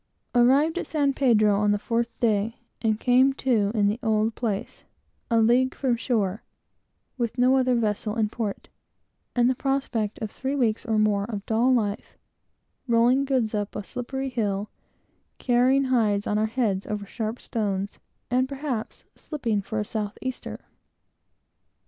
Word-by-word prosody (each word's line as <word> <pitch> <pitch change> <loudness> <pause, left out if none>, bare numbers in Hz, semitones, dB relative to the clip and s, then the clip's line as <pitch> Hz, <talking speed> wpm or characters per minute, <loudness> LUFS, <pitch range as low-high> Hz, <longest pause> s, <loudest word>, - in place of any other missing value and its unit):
Arrived 275 +8 +4
at - - -5
San 285 -3 +1
Pedro 215 -7 +3
on 210 0 +2
the 205 - +3
fourth 230 +3 -1
day, 220 -1 +1 0.2
and 220 -2 +1
came 255 +3 +4
to 235 -7 +1
in 210 -2 +3
the 210 +3 -1
old 220 -1 +1
place, 215 -5 -4 0.5
a 230 - +3
league 245 +3 +3
from 255 -3 +1
shore, 215 -4 -1 0.8
with 235 0 -2
no 250 +2 +4
other 255 -1 +3
vessel 210 -1 -1
in 220 -2 +1
port, 215 -2 -4 0.7
and 240 -1 +4
the 260 - +3
prospect 255 -5 -1
of 215 -2 -5
three 270 +2 -3
weeks, 240 -3 0
or 220 -1 +1
more, 210 -2 +2
of 205 -3 -6
dull 230 +3 +2
life, 210 -5 -1 0.7
rolling 240 +3 +3
goods 255 -5 0
up 205 -1 -3
a 210 - -4
slippery 265 +5 -4
hill, 210 -4 -2 0.7
carrying 255 +2 +3
hides 220 -6 +1
on 210 - 0
our 220 - +2
heads 215 -5 -1
over 210 -1 -3
sharp 220 +3 -4
stones, 200 -3 -3 0.3
and, 255 +1 +2
perhaps, 275 -5 -4
slipping 235 -9 -2
for 215 +2 -4
a 210 - -2
south 210 -1 -4
easter. 260 -1 -5
230 Hz, 155 wpm, -25 LUFS, 210-255 Hz, 0.8 s, Arrived